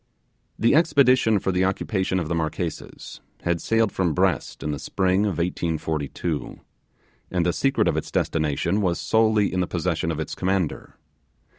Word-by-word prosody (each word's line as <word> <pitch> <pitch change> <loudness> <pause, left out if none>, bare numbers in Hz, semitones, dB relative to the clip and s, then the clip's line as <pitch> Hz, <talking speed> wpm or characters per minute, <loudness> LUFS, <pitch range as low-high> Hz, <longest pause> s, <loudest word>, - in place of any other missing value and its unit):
The 115 - +3
expedition 135 -8 +4
for 95 - -1
the 90 0 +1
occupation 95 0 0
of 80 - -3
the 85 - -2
Marquesas 80 +1 -4 0.2
had 85 -1 0
sailed 115 -1 +1
from 90 -4 0
Brest 90 -5 0
in 75 - -2
the 75 - -4
spring 95 +5 +1
of 100 -6 -1
1842, 80 -2 -3 0.7
and 90 -2 0
the 90 - +1
secret 135 0 +1
of - - +1
its - - -3
destination 80 +5 0
was 90 -3 0
solely 110 -3 +2
in 90 - 0
the 90 - 0
possession 85 -1 -1
of 80 -2 -3
its 80 - -4
commander. 95 -3 -2
90 Hz, 160 wpm, -24 LUFS, 80-100 Hz, 0.7 s, expedition